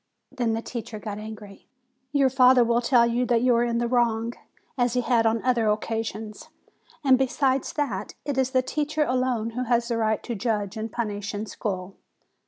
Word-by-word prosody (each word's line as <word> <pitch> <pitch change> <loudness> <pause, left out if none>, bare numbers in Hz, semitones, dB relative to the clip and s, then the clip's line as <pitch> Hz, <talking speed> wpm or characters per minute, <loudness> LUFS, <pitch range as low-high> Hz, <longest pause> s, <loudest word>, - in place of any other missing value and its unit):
Then 240 -4 -1
the 225 +1 -3
teacher 230 -2 -6
got 210 -1 -6
angry. 215 -2 -10 0.4
'Your 275 -2 +3
father 255 -1 +6
will 235 +1 +2
tell 240 -1 +4
you 235 +1 +1
that 240 -1 +2
you 250 -1 +4
are 235 - +3
in 235 -1 0
the 240 0 0
wrong, 235 -1 +1 0.4
as 245 -3 +1
he 250 - +1
has 235 -2 +2
on 225 0 0
other 240 -3 +2
occasions. 215 0 -3 0.5
And 260 -2 +5
besides 265 0 +1
that, 215 -10 -3
it 285 - -2
is 265 -1 +1
the 260 -1 +2
teacher 300 +3 -1
alone 250 -4 0
who 250 +2 -3
has 235 0 +1
the 235 - 0
right 220 -1 0
to 240 - -4
judge 210 -2 -2
and 220 0 -4
punish 205 -3 -3
in 205 +2 -3
school." 190 -3 -5
235 Hz, 190 wpm, -25 LUFS, 220-255 Hz, 0.5 s, father